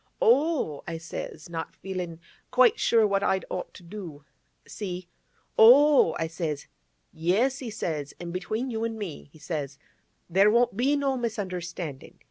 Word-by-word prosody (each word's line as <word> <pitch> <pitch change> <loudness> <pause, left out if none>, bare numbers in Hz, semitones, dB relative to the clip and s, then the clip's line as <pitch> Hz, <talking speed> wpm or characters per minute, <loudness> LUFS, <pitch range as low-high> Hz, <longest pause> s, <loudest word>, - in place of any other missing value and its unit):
"Oh!" 315 - +2
I 165 -1 -3
says—not 165 0 -6
feelin' 180 -3 -5 0.3
quite 250 -2 +4
sure 225 -2 +4
what 200 -1 +1
I'd 190 -1 +1
ought 180 - -4
to - - -12
do—see? 175 +1 -9 0.5
"Oh!" 265 - +7
I 165 - -1
says. 160 -3 -4 0.5
"Yes," 210 +12 +1
he 250 - -5
says; 155 -9 -4
"an' 175 -1 -6
between 215 +8 -3
you 225 -1 -2
an' 225 -1 -2
me," 185 -9 -7
he 155 - -17
says, 145 -3 -4 0.5
"there 195 +4 +5
won't 240 0 +3
be 265 +6 +2
no 275 -2 0
misunderstanding. 180 - -5
190 Hz, 140 wpm, -27 LUFS, 165-230 Hz, 0.5 s, Oh